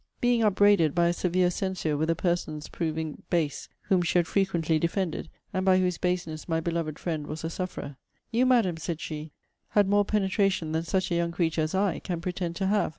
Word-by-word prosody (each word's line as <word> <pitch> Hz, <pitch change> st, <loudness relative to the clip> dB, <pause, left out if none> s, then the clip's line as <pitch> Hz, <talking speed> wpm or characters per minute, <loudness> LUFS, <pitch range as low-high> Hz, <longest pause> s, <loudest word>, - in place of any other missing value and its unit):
Being 245 Hz, -1 st, +3 dB
upbraided, 205 Hz, -6 st, +4 dB
by 170 Hz, -1 st, +4 dB
a -, -, +1 dB
severe 180 Hz, +1 st, +1 dB
censure, 180 Hz, -5 st, -1 dB
with 155 Hz, +2 st, 0 dB
a 165 Hz, -, +3 dB
person's 160 Hz, -4 st, -2 dB
proving 160 Hz, -2 st, -3 dB
base, 160 Hz, -5 st, -1 dB
whom 185 Hz, -2 st, +2 dB
she 175 Hz, +1 st, +1 dB
had 175 Hz, -, +3 dB
frequently 170 Hz, -4 st, +1 dB
defended, 170 Hz, 0 st, -1 dB, 0.2 s
and 185 Hz, -, 0 dB
by 190 Hz, -1 st, +5 dB
whose 180 Hz, -2 st, +1 dB
baseness 180 Hz, -3 st, -2 dB
my 160 Hz, 0 st, +1 dB
beloved 165 Hz, -2 st, -2 dB
friend 155 Hz, -4 st, -3 dB
was 155 Hz, +1 st, -6 dB
a 165 Hz, -, -3 dB
sufferer; 160 Hz, -6 st, -5 dB, 0.3 s
'You, 245 Hz, +3 st, +3 dB
Madam,' 225 Hz, -10 st, +3 dB
said 160 Hz, 0 st, -4 dB
she, 155 Hz, -1 st, -5 dB, 0.4 s
'had 205 Hz, -2 st, +3 dB
more 205 Hz, +1 st, +4 dB
penetration 195 Hz, -5 st, +1 dB
than 160 Hz, +1 st, 0 dB
such 185 Hz, +2 st, 0 dB
a -, -, +2 dB
young 170 Hz, 0 st, 0 dB
creature 165 Hz, -2 st, 0 dB
as 155 Hz, +3 st, -1 dB
I 195 Hz, -3 st, +1 dB
can 175 Hz, -2 st, -4 dB
pretend 175 Hz, -1 st, -3 dB
to 195 Hz, -, -1 dB
have. 205 Hz, +2 st, +2 dB
175 Hz, 205 wpm, -27 LUFS, 160-190 Hz, 0.4 s, by